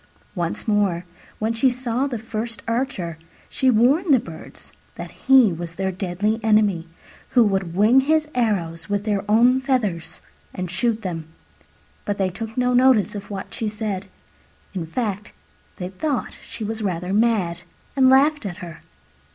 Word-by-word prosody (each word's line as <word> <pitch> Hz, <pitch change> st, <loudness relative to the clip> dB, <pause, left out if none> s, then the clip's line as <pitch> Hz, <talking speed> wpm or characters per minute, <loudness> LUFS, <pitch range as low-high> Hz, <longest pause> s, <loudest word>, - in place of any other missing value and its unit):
Once 175 Hz, +1 st, -3 dB
more, 200 Hz, -5 st, +1 dB, 0.3 s
when 220 Hz, +1 st, -1 dB
she 230 Hz, +3 st, +3 dB
saw 250 Hz, +1 st, -1 dB
the 250 Hz, -4 st, -3 dB
first 220 Hz, 0 st, -5 dB
archer, 195 Hz, -9 st, -2 dB, 0.3 s
she 260 Hz, -, +1 dB
warned 265 Hz, -, +3 dB
the 265 Hz, -, +6 dB
Birds 165 Hz, -7 st, -11 dB, 0.2 s
that -, -, -7 dB
he 260 Hz, -8 st, +5 dB
was 165 Hz, 0 st, -6 dB
their 190 Hz, +1 st, -1 dB
deadly 195 Hz, +4 st, -1 dB
enemy, 210 Hz, -6 st, +3 dB, 0.5 s
who 240 Hz, -, +8 dB
would 190 Hz, -5 st, -1 dB
wing 215 Hz, +7 st, +5 dB
his 310 Hz, +3 st, +2 dB
arrows 180 Hz, -9 st, -1 dB
with 205 Hz, 0 st, 0 dB
their 205 Hz, -2 st, 0 dB
own 245 Hz, +4 st, +5 dB
feathers 215 Hz, -, -1 dB, 0.4 s
and 180 Hz, -1 st, -4 dB
shoot 220 Hz, +4 st, 0 dB
them. 165 Hz, -4 st, -4 dB, 0.8 s
But 205 Hz, -1 st, -2 dB
they 190 Hz, -1 st, +1 dB
took 225 Hz, +5 st, -7 dB
no 250 Hz, 0 st, +2 dB
notice 245 Hz, -4 st, +4 dB
of 200 Hz, -1 st, -7 dB
what 195 Hz, -1 st, -6 dB
she 220 Hz, -, -2 dB
said: 210 Hz, -2 st, -4 dB, 0.7 s
in 175 Hz, -4 st, -4 dB
fact, 210 Hz, +1 st, -3 dB, 0.4 s
they 180 Hz, 0 st, -4 dB
thought 270 Hz, +8 st, -3 dB
she 225 Hz, -, -7 dB
was 220 Hz, +1 st, -4 dB
rather 180 Hz, -2 st, -2 dB
mad, 205 Hz, -6 st, +1 dB, 0.3 s
and 260 Hz, -1 st, +5 dB
laughed 285 Hz, +2 st, +4 dB
at 190 Hz, -4 st, -5 dB
her. 175 Hz, -5 st, -9 dB
210 Hz, 160 wpm, -22 LUFS, 185-245 Hz, 0.8 s, who